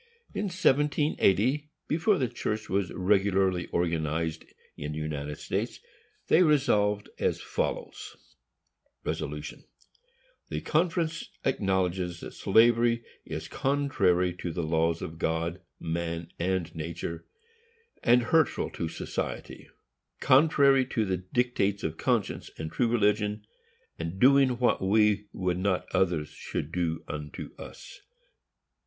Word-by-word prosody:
In 210 - -2
1780, 150 - +2 0.2
before 170 +6 +2
the 130 - +1
church 110 -1 -3
was 95 -2 0
regularly 95 -1 +2
organized 80 -1 -1 0.3
in 75 +1 -5
the - - -5
United 75 -1 -4
States, - - -3 0.5
they 170 - +5
resolved 115 - +3
as - - +1
follows: - - -4 0.9
The 75 -2 -4 1.0
conference 165 0 0 0.2
acknowledges 95 -7 0
that - - -8
slavery 115 +2 +4 0.2
is 80 0 -5
contrary 130 -11 +1
to 85 - -4
the 85 +1 -3
laws 80 +1 +1
of 80 0 -7
God, 85 +3 -1 0.2
man 85 0 -3
and 90 -2 -1
nature, 85 +1 -5 0.7
and 120 0 +5
hurtful 160 +5 +2
to 80 - -3
society; - - -5 0.5
contrary 140 -1 +5
to 115 -4 0
the 95 -2 0
dictates 100 +1 0
of 80 0 -3
conscience - - -1
and 80 0 -5
true 120 +8 +1
religion; 105 -2 +1 0.5
and 85 +3 -4
doing 135 0 +5
what 125 0 +2
we 105 +1 +3
would 90 -1 -1
not 95 -1 0
others 85 -5 +1
should 75 0 -5
do 85 -2 -1
unto 75 0 -6
us. - - -11
95 Hz, 115 wpm, -28 LUFS, 85-125 Hz, 1.0 s, they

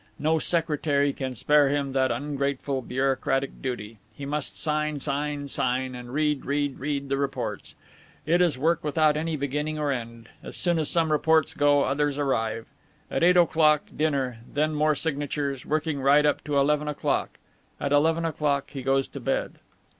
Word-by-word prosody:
No 160 +2 +1
secretary 150 -4 +1
can 130 -2 -4
spare 145 +3 +4
him 140 -1 -1
that 130 -1 +2
ungrateful 140 -1 -2
bureaucratic 135 +1 -1
duty. 115 -4 -5 0.2
He 140 - -7
must 150 0 -3
sign, 150 -1 -1
sign, 145 +1 -2
sign, 130 -1 -1
and 125 -1 -8
read, 150 0 0
read, 145 -1 -1
read 140 0 -2
the 135 0 0
reports. 140 -1 -3 0.5
And 155 - 0
it 175 - +4
is 170 -7 +2
work 160 +4 +1
without 150 0 +2
any 160 +1 -1
beginning 150 +2 -2
or 150 -2 0
end; 115 -2 -6
as - - -8
soon 175 -2 +1
as 155 - 0
some 165 -2 +1
reports 155 0 +3
go, 145 -1 +3
others 145 +1 0
arrive. 115 -6 -1 0.5
At - - -1
eight 180 +1 +5
o'clock, 155 -3 +4
dinner, 135 -6 -1
and - - -19
then 155 +1 +1
more 155 0 +2
signatures, 145 -3 -2
working 155 -1 -1
right 145 +2 +5
up 150 - +1
to 145 -2 0
eleven 150 +2 +2
o'clock. 150 - -1 0.4
At 140 - -2
eleven 160 +3 +3
o'clock 145 -3 -1
he 135 - -6
goes 135 +1 +1
to - - -8
bed." - - -2
145 Hz, 175 wpm, -26 LUFS, 135-150 Hz, 0.5 s, eight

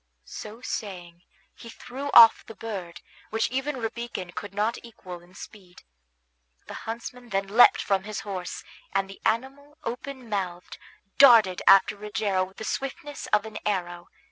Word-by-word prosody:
So 215 +3 -9
saying, 175 -8 -6 0.3
he 230 - -12
threw 270 +5 -7
off 225 -1 +9
the 225 - -10
bird, 185 -7 -7 0.3
which 225 +1 -1
even 270 +2 -2
Rabican 225 -5 -5
could 205 +2 -7
not 210 +4 -1
equal 185 -7 -10
in 175 +2 -20
speed. 185 -4 -13 0.8
The - - -9 0.2
huntsman 240 +1 -7
then 195 -1 -1
leapt 225 +5 +6
from 195 -1 +1
his 215 0 -5
horse, 185 -3 -6 0.3
and 195 0 0
the 195 - -13
animal, 270 +5 -2
open 255 +2 -6
mouthed, 185 -4 -4 0.4
darted 225 -9 +7
after 195 +1 +6
Rogero 205 -2 -1
with 190 +1 -10
the - - -7
swiftness 275 +4 -5
of 210 0 +2
an 220 -1 -7
arrow. 175 -4 -3
210 Hz, 150 wpm, -26 LUFS, 190-235 Hz, 0.8 s, off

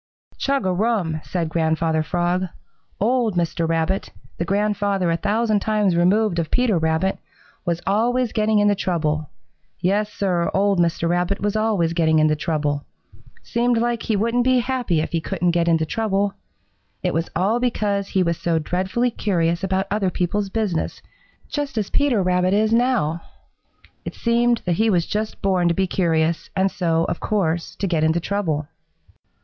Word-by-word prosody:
"Chug 275 -6 0
a 185 - +2
rum!" 180 -6 0
said 175 -3 -2
Grandfather 160 0 +1
Frog. 175 +3 0 0.5
"Old 230 -1 +1
Mr. 170 -1 0
Rabbit, 165 +4 0 0.3
the 170 - 0
grandfather 200 -2 0
a - - +2
thousand 215 +3 +1
times 210 -3 +1
removed 185 +2 +2
of 160 -2 -2
Peter 240 -8 +2
Rabbit, 160 +4 0 0.5
was 170 0 -1
always 235 +4 +1
getting 215 0 +2
into 205 0 +4
trouble. 155 -6 -1 0.5
Yes, 205 +3 0
Sir, 180 -5 0
old 200 -1 +2
Mr. 170 -1 +1
Rabbit 180 +3 0
was 205 +1 -1
always 210 -7 +1
getting 160 -2 +2
into 155 0 +3
trouble. 150 -2 -1 0.6
Seemed 240 0 +1
like 235 0 0
he 220 - -1
wouldn't 230 +4 +1
be 255 0 +3
happy 245 -9 0
if - - -4
he 165 -2 0
couldn't 175 +2 0
get 170 0 +1
into 165 -1 +3
trouble. 200 +1 0 0.7
It 180 - 0
was 165 +1 -1
all 200 +7 +1
because 205 -5 0
he 190 -2 +1
was 170 -1 -1
so 170 -1 0
dreadfully 190 +9 -1
curious 170 -5 0
about 190 0 0
other 200 -2 +1
people's 195 +3 -1
business, 200 -6 -2 0.4
just 290 -4 -4
as 210 -3 -1
Peter 265 -9 +2
Rabbit 180 +1 +2
is 215 +1 +2
now. 230 -10 +1 0.8
It - - -7
seemed 235 0 +1
that 175 -2 0
he 220 +2 +3
was 175 -4 +2
just 215 +1 -4
born 185 -3 +2
to 170 - +2
be 190 - +1
curious 165 -3 0
and 190 0 +2
so, 165 -3 +1
of 170 - -3
course, 175 -6 -1
to - - -3
get 165 -4 0
into 160 +2 +2
trouble. 165 -6 -2
190 Hz, 165 wpm, -22 LUFS, 170-215 Hz, 0.8 s, into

